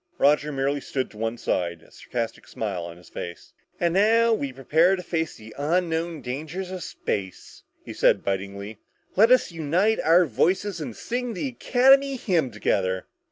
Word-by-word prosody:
Roger 150 +1 +3
merely 140 +1 -1
stood 130 -1 -3
to 105 - -15
one 115 +1 -2
side, 85 -6 -2
a - - -21
sarcastic 115 -2 -5
smile 100 -6 -4
on 85 0 -9
his 90 - -17
face. 85 0 -8 0.3
"And 170 -1 +1
now, 225 +4 +4
as - - 0
we 140 -1 -3
prepare 160 +8 +3
to 180 - -7
face 165 -2 -2
the 110 0 -12
unknown 165 0 0
dangers 155 +9 -5
of 185 -1 -5
space," 95 - -5 0.2
he - - -7
said - - +3
bitingly, 100 +2 -4 0.4
"let 220 +4 +6
us 255 -6 +4
unite 170 +7 +1
our 175 +2 +5
voices 185 +2 0
and 125 -7 -5
sing 245 -1 -3
the 270 +9 -2
Academy 270 +3 +4
hymn 175 - 0
together! 95 -4 -1
155 Hz, 170 wpm, -25 LUFS, 110-190 Hz, 0.4 s, let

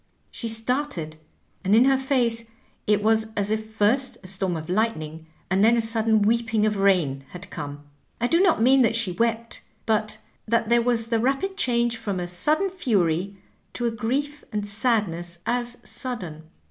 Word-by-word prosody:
She 230 - -5
started, 225 - +1 0.5
and 195 +3 +3
in 235 +3 +6
her 270 0 +4
face 250 -4 0 0.4
it 210 0 +2
was 220 0 +3
as 205 0 -1
if 220 0 -2
first 220 +5 +1
a - - -10
storm 185 -2 -1
of 155 0 -7
lightning 160 -6 -2 0.2
and 190 +2 +2
then 230 +2 +5
a - - +3
sudden 225 -1 +2
weeping 225 0 +1
of 215 -1 0
rain 175 -9 +2
had 180 +1 -9
come. 145 0 -7 0.4
I 235 - 0
do 335 +8 +3
not 350 - +3
mean 265 +2 +5
that 230 -2 +3
she 230 -5 0
wept, 230 +3 -1 0.2
but 215 -1 0 0.3
that 230 0 +1
there 235 0 +4
was 235 -1 0
the 230 0 0
rapid 275 - 0
change 235 -7 0
from 205 -4 -3
a 175 - -3
sudden 305 - +2
fury 195 - 0 0.4
to 240 - -3
a 235 - +1
grief 280 +7 -3
and 210 -1 -3
sadness 200 -6 -1
as 245 0 -2
sudden. 175 - -6
225 Hz, 175 wpm, -24 LUFS, 195-240 Hz, 0.5 s, in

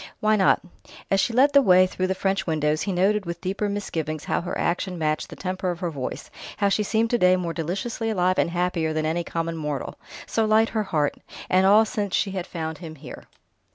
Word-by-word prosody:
"Why 215 0 +3
not?" 195 -2 +3 0.5
As 195 - +4
she 235 - +1
led 270 +5 +4
the 280 - +7
way 185 -6 +6
through 185 0 -2
the 190 - -1
French 190 -1 -1
windows, 155 -1 0
he 200 - -1
noted 195 +2 +1
with 170 0 -4
deeper 195 +3 -2
misgivings 160 -7 -3
how - - -1
her 175 - -4
action 180 +1 -1
matched 155 -1 -1
the - - -9
temper 185 0 -3
of 175 -1 -3
her 175 -2 -2
voice, 135 -4 -6 0.3
how 200 - +2
she 205 - +1
seemed 220 +2 0
to 240 - +2
day 180 0 +5
more 175 -2 -2
deliciously 195 +8 -3
alive 185 -3 +1
and - - +2
happier 170 -2 -1
than 155 0 -1
any 165 +2 0
common 165 0 -3
mortal. 150 -3 -4 0.3
So 225 - 0
light 220 +1 +3
her 220 - -1
heart! 150 -6 0 0.3
And 185 +1 +4
all 215 +3 +6
since 205 -4 -2
she 195 - 0
had 190 -1 -4
found 160 -2 -5
him 160 -3 -8
here! 140 -3 -11
185 Hz, 225 wpm, -24 LUFS, 165-205 Hz, 0.5 s, the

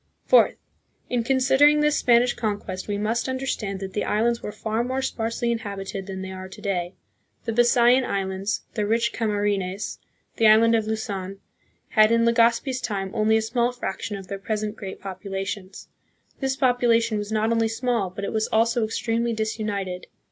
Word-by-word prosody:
Fourth. - - +5 0.6
In 245 -2 +1
considering 270 +4 +4
this 300 0 +3
Spanish 240 0 +4
conquest, 205 -5 -4
we 205 -1 -1
must 225 +5 -1
understand 260 -7 -3
that 190 -1 -6
the 210 - -1
islands 235 +3 +1
were - - -5
far 220 +2 -2
more 260 +2 -2
sparsely 230 -1 -1
inhabited 200 -3 -5
than 190 -1 -5
they 190 - -6
are 185 0 -8
to 190 - -12
day. 180 -3 -2 0.5
The 230 - -1
Bisayan 240 +2 +4
islands, 195 -1 -2
the 210 -2 -1
rich 230 +2 +1
Camarines, 205 -3 -1 0.4
the 225 - +5
island 225 +2 +6
of 220 -2 +1
Luzon, 200 -4 -4 0.5
had, 215 0 +5
in 230 0 +3
Legazpi's 235 +3 +2
time, 195 -3 -3
only 220 0 +3
a 220 - 0
small 240 +2 +1
fraction 210 -3 -4
of 195 - -9
their 195 +1 -5
present 215 +1 -3
great 195 -4 -7
popula 195 0 -5
tions. 195 -1 -7 0.5
This 265 -1 -1
population 240 -4 +2
was 205 +1 -5
not 220 +1 +1
only 225 -1 +2
small, 225 -3 -1
but 200 +2 -6
it - - -4
was 220 0 0
also 230 +1 +2
extremely 230 +1 -1
disunited. 210 -4 -3
220 Hz, 170 wpm, -24 LUFS, 200-235 Hz, 0.6 s, island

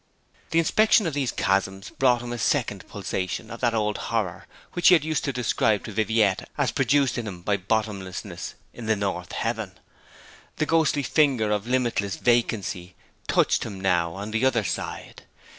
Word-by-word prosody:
The 165 - 0
inspection 215 +6 +4
of 165 - -1
these 135 -4 0
chasms 95 0 -1
brought 125 -5 +2
him 120 0 -5
a 120 - -5
second - - 0
pulsation 95 -2 -4
of 115 - -7
that 120 -2 +1
old 105 -1 0
horror - - -2 0.3
which 175 - +2
he 180 - +9
had 160 - +1
used 155 -1 -1
to 140 - 0
describe 110 -4 +1
to - - -6
Viviette 110 -2 +1
as - - +1
produced 140 -3 +2
in 115 - -5
him 90 -4 -8
by 100 +2 +1
bottomlessness 100 -2 -3 0.2
in 115 -2 -8
the 110 - +3
north 95 -3 -3
heaven. - - -3 0.8
The 155 - 0
ghostly 155 -3 +2
finger 130 -6 +2
of 105 +1 -1
limitless 120 -6 0
vacancy 105 -7 0 0.3
touched - - +2
him 100 -4 -6
now 85 -3 +1
on 100 +2 -6
the 110 +3 0
other 120 -4 +3
side. - - -5
110 Hz, 175 wpm, -25 LUFS, 100-130 Hz, 0.8 s, he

